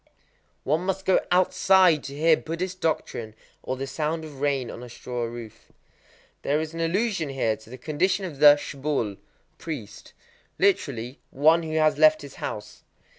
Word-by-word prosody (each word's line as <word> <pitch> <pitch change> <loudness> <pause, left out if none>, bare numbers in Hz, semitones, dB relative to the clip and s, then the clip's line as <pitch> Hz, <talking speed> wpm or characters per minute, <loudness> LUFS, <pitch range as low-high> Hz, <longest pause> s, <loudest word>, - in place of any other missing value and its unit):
_ - - -45 0.6
One 155 +4 +1
must 190 0 -2
go 190 - +4
outside 185 -2 +4
to 140 +1 -7
hear 160 +1 +5
Buddhist 180 +4 -5
doctrine 115 -9 -2 0.3
or 130 - -4
the 135 - -3
sound 155 +4 -3
of 145 -3 -11
rain 140 -4 0
on - - -9
a 125 - -9
straw 120 0 -5
roof. 115 -2 -10 0.7
There 145 +2 +1
is 160 0 -4
an 165 - -6
allusion 175 -1 0
here 130 -5 0
to 110 +1 -17
the 130 - -9
condition 185 +8 0
of 150 -7 -8
the 145 -1 +9
shukké 140 -8 -3 0.4
(priest): 140 -11 -8 0.4
literally, 135 - 0
"one 160 +5 +4
who 160 -1 -5
has 155 -1 +2
left 310 0 +5
his - - -11
house." - - -6
150 Hz, 170 wpm, -25 LUFS, 130-170 Hz, 0.7 s, the